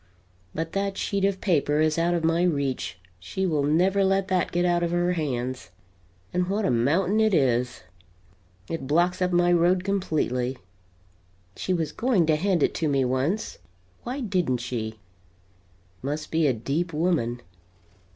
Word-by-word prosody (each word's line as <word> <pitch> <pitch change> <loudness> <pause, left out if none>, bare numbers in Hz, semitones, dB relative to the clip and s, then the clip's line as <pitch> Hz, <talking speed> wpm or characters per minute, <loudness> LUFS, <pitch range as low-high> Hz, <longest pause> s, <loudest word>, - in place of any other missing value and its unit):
But 165 +1 -3
that 195 0 -2
sheet 200 -1 -1
of 195 -1 0
paper 150 -5 +1
is 155 +1 +2
out 175 +1 +2
of 170 - -1
my 165 +1 +2
reach 140 - -1 0.2
she 100 - -3
will 155 -5 +1
never 180 +7 +2
let 195 0 +1
that 185 -1 +1
get 175 +1 +1
out 175 -1 +2
of 170 - 0
her 175 +1 +1
hands. 130 - -3 0.6
And 180 0 0
what 205 +1 0
a - - +2
mountain 165 - +2
it 220 -3 +3
is! 125 - +1 0.8
It 165 -5 -4
blocks 175 +5 +2
up 180 0 +1
my 175 0 +3
road, 175 +2 +3
completely. 150 -10 -1 1.0
She - - -3
was 165 -4 0
going 225 -8 +2
to 155 -1 +3
hand 175 -1 +1
it - - +2
to 160 - +2
me, 135 -2 +2
once. 135 +12 -1 0.4
Why 260 +4 -4
didn't 180 - 0
she! 115 -2 -5 1.0
Must 150 +3 -4
be 160 -1 +2
a 135 - +3
deep 145 +9 -2
woman. 150 -8 0
165 Hz, 160 wpm, -25 LUFS, 140-185 Hz, 1.0 s, it